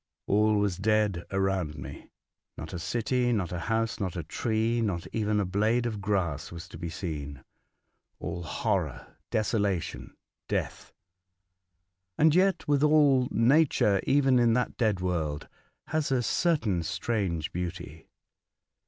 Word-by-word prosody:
All 105 +1 +3
was 100 -4 +1
dead 105 -3 +1
around 95 -5 -1
me. 70 - -9 0.5
JSTot - - -7
a 90 - -4
city, 120 +6 0
not 100 -7 -1
a 90 - -3
house, 115 +5 -1
not 95 -5 -3
a 85 - -3
tree, 115 +7 0
not 95 -7 -1
even 105 -1 +1
a 100 - +1
blade 110 +6 +1
of 110 -4 -3
grass 95 -8 -1
was 85 +1 -8
to - - -10
be 85 -1 -4
seen. 75 -5 -6 0.7
All 85 - -5
horror, 85 - -2
desolation, 100 -5 -1 0.3
death - - -3 1.2
1 150 - +3
And 160 - +6
yet, 190 0 +2
withal, 145 -3 +4
Nature, 115 -5 +3
even 135 -2 +4
in 120 -1 +4
that 125 +1 0
dead 105 -6 +1
world, 80 -5 -2 0.4
has 155 -2 -1
a 125 -2 +2
certain 115 - +1
strange 85 -3 -2
beauty. 85 -3 -6
105 Hz, 135 wpm, -28 LUFS, 90-120 Hz, 1.2 s, And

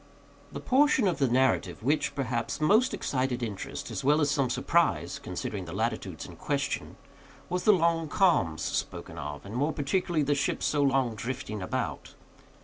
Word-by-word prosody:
The - - -6
portion 265 -4 +3
of 175 - 0
the 135 - +3
narrative 130 -2 +1
which, 145 +5 +1
perhaps, 125 -4 -2
most 210 +11 +4
excited 130 -2 -1
interest, 105 -4 -5
as - - -4
well 145 +3 +4
as 145 -2 +2
some 140 -4 +1
surprise, 165 +7 +1
considering - - -5
the - - -8
latitudes - - -2
in - - -11
question, - - -2 0.5
was 180 0 -2
the 215 - +7
long 165 -2 +2
calms 95 - +2
spoken - - -3
of, 75 +3 -6
and 100 - -8
more 145 +6 +1
particularly 160 +2 0
the 145 +1 +2
ship's 140 - -1
so 145 - +1
long 135 -4 +2
drifting 115 -2 -5
about. 90 - -4
140 Hz, 165 wpm, -28 LUFS, 125-165 Hz, 0.5 s, the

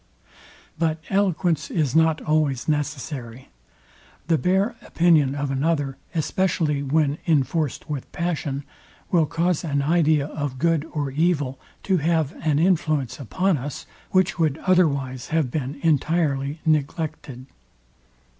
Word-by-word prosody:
But 160 -1 +1
eloquence 180 -5 +1
is 150 -5 0
not 160 -1 +3
always 150 -5 +1
necessary. 140 -4 -3 0.8
The 160 -3 +3
bare 190 - +1
opinion 155 -5 +3
of 145 -1 -2
another, 140 -1 0 0.2
especially 160 -2 0
when 145 +1 +1
inforced 150 -1 0
with 145 -4 -5
passion, 150 -5 -2 0.5
will 165 -4 +3
cause 170 +1 0
an 140 -4 0
idea 155 -2 +3
of 145 -3 -4
good 165 +1 +1
or 145 -3 -2
evil 145 -3 0 0.2
to 190 -2 +2
have 160 -2 +1
an 155 -2 +2
influence 155 -6 +1
upon 180 - 0
us, 140 +2 -6 0.2
which 185 0 +2
would 155 -3 +2
otherwise 140 -9 +2
have 155 -6 0
been 140 0 -3
entirely 150 -2 +1
neglected. 150 -4 -1
155 Hz, 120 wpm, -23 LUFS, 140-165 Hz, 0.8 s, not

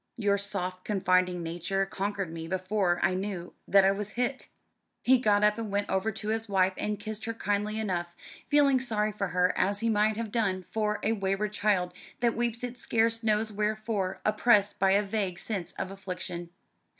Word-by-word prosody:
Your 200 -3 +2
soft 185 -2 -2
confiding 185 -3 +1
nature 175 +4 -1
conquered 195 -3 -3
me 165 0 -6
before 185 0 0
I - - +2
knew 185 -2 -4
that 195 -1 +6
I 195 - +5
was 210 +1 -4
hit." 250 +2 -2 0.5
He 255 +1 +5
got 210 -3 +3
up 210 +1 +3
and 220 -3 -4
went 205 0 -1
over 190 +3 +1
to 215 -1 -4
his 225 0 -2
wife 190 -1 +3
and 210 -1 -2
kissed 215 0 -5
her 230 0 -3
kindly 210 0 -1
enough, 175 -5 -2 0.3
feeling 280 -2 +5
sorry 215 -4 0
for 200 -1 -2
her 180 +1 +1
as 200 +2 +1
he 230 - +1
might 215 0 +2
have 225 -2 -4
done 195 -5 0
for 210 -1 0
a 220 - +2
wayward 195 0 -1
child 195 -4 +1 0.3
that 235 -1 +2
weeps 235 0 -1
it 245 0 -5
scarce 230 0 +2
knows 215 -1 +1
wherefore, 210 -2 -1
oppressed 210 -2 +3
by 195 0 +4
a 205 +1 +4
vague 200 -3 -2
sense 185 -5 -4
of 190 - -5
affliction. 180 -3 -6
205 Hz, 185 wpm, -29 LUFS, 190-220 Hz, 0.5 s, that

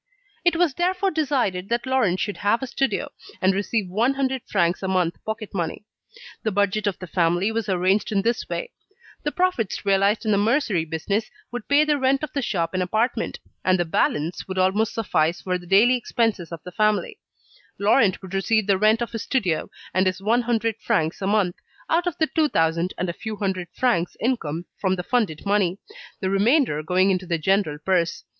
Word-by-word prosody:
It 345 -2 +3
was 335 -4 +2
therefore 365 +4 0
decided 260 - 0
that 235 +1 0
Laurent 250 -9 +1
should 205 - -2
have 215 +5 +1
a - - 0
studio, 270 +1 -1 0.3
and 190 +1 +3
receive 200 +1 -1
one 230 +9 +1
hundred 265 -1 -1
francs 175 -3 +1
a 190 - -2
month 180 -3 0
pocket 220 -1 -5
money. 175 +2 -3 0.6
The 220 - -1
budget 205 +1 +1
of 195 - -1
the 185 - -7
family 175 +4 +1
was 225 -1 -2
arranged 190 +4 +1
in 200 -2 +1
this 235 +1 -1
way: - - -4 0.5
the 295 - -2
profits 355 - -1
realised 200 +3 +2
in 215 - +2
the 200 - +3
mercery 215 - +1
business 195 +7 -2 0.2
would 245 -3 -6
pay 285 +1 +5
the 300 -1 +1
rent 270 +2 +2
of 305 - -4
the 280 - -1
shop 170 -8 -1
and 185 - 0
apartment, 220 +7 0 0.3
and 185 0 +3
the 175 - 0
balance 160 0 -1
would 190 0 -5
almost 195 +4 +1
suffice 170 -6 +1
for 180 -1 -1
the 175 - -14
daily 210 +7 +5
expenses 225 -7 -1
of 165 -2 -7
the 180 - -8
family; 215 +1 0 0.6
Laurent 200 -1 +3
would 190 0 -9
receive 215 +2 +1
the 195 -2 +2
rent 215 +3 +4
of 235 - -6
his 225 -2 -4
studio 190 -12 -1 0.2
and 185 +1 +2
his 185 0 -1
one 225 +5 +2
hundred 230 -2 0
francs 160 -2 0
a 195 - -1
month, 200 -4 +1 0.3
out 345 +2 +2
of 350 - -2
the 315 - +3
two 315 -1 +1
thousand 165 0 +1
and 185 - -1
a 170 - -2
few 220 +4 -6
hundred 190 -3 -2
francs 225 -10 0
income 175 - -1
from 190 -1 +1
the 180 - -4
funded 210 -9 -1
money, 200 -3 +1 0.4
the 190 - 0
remainder 210 - +3
going 185 +4 +2
into 185 -1 -1
the 170 -1 0
general 190 -2 +1
purse. 170 +1 0
200 Hz, 200 wpm, -23 LUFS, 180-235 Hz, 0.6 s, pay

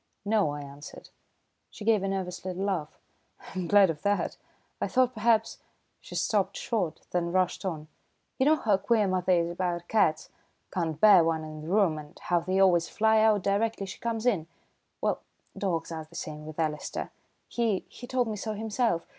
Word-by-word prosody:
"No," 205 -5 +2
I 145 0 -4
answered. 140 +1 -11 0.6
She 210 - -10
gave 220 -3 +4
a 195 - -1
nervous 190 -2 -3
little 185 +1 -3
laugh. 175 -6 -2 0.6
"I'm 185 -2 -3
glad 200 -1 +6
of 150 - -9
that. 205 0 0 0.5
I - - +1
thought 255 -1 +2
perhaps 225 0 +2 0.2
" - - -46
She - - -10
stopped - - 0
short, 225 - -2
then 170 -1 0
rushed 185 +1 +1
on, 155 -4 -4 0.5
"You 265 - +3
know 310 - +6
how 215 -9 +2
queer 215 0 +2
mother 185 0 +1
is 170 -1 +2
about 175 -1 -2
cats 160 -8 +1 0.4
can't 160 -4 -2
bear 200 -4 +8
one 160 -1 0
in 155 0 -8
the 155 - -8
room, 180 -4 +2
and 150 0 -12
how 175 -1 +1
they 185 +3 -1
always 175 -3 +4
fly 220 0 +3
out 215 -3 +4
directly 200 +1 0
she 190 - -8
comes 230 -1 -2
in? 190 -10 +1 0.5
Well, - - 0 0.3
dogs 170 -5 -2
are 160 -1 -5
the 170 - -16
same 155 -2 -6
with 155 +1 -8
Alister. 155 -2 -2 0.4
He 225 -5 0
he 245 - -11
told 250 -1 +1
me 215 -1 -3
so 215 +2 -3
himself. 220 -4 0
185 Hz, 190 wpm, -28 LUFS, 165-215 Hz, 0.6 s, bear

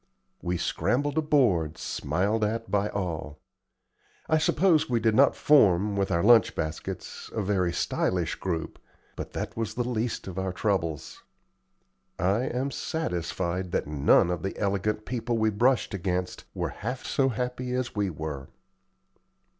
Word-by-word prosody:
We 90 0 -1
scrambled 145 - 0
aboard, 115 - +2
smiled 105 +4 -1
at 115 +2 -2
by 100 +1 +1
all. 80 -6 -4 0.9
I 155 - +3
suppose 165 -1 +3
we 120 -2 +2
did 110 -1 +2
not 135 +5 +5
form, 105 -8 +4
with 100 -1 0
our 85 - +1
lunch 115 0 +6
baskets, 80 -1 -5
a 110 - 0
very 95 -3 +1
stylish 85 0 0
group, 85 -4 -4 0.4
but - - -7
that - - -4
was 115 -1 -3
the 120 0 -1
least 120 -1 -2
of 95 0 -5
our 95 -1 -2
troubles. 90 -6 -2 1.0
I 100 +8 +1
am 130 +3 -2
satisfied 90 - -2
that - - 0
none 75 +4 +3
of 90 - -2
the 95 - -4
elegant 105 +1 -1
people 120 -1 -2
we 110 0 +2
brushed 120 +3 +2
against 90 -1 -2
were - - -1
half 125 +4 -5
so 135 -1 +2
happy 125 +1 -3
as 125 -2 -2
we 100 -2 0
were. 75 -4 -5
105 Hz, 145 wpm, -27 LUFS, 90-125 Hz, 1.0 s, lunch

